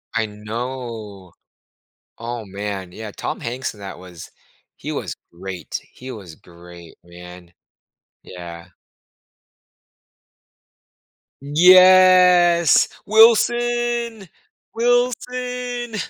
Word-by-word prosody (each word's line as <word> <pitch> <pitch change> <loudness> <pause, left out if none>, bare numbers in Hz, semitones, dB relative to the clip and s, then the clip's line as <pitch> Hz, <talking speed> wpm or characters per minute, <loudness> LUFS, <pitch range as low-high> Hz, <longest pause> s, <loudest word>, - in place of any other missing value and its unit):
I 115 -1 +1
know. 105 -3 -7 0.9
Oh, 115 -1 -6
man, 100 -1 -6
yeah, 105 +2 -9
Tom - - -6
Hanks 125 0 -5
in 105 - -17
that 95 -2 -9
was 90 -3 -12 0.5
he - - -7
was - - -5 0.2
great. 90 +1 -7
He 130 +1 -11
was 95 -9 -10
great, 85 -1 -16
man, 90 0 -14 0.7
yeah. 85 -1 -10 2.7
Yes. 180 +1 +5 0.2
"Wilson! 235 -1 +2 0.4
Wilson!" 245 0 -2
120 Hz, 80 wpm, -20 LUFS, -, 2.7 s, Yes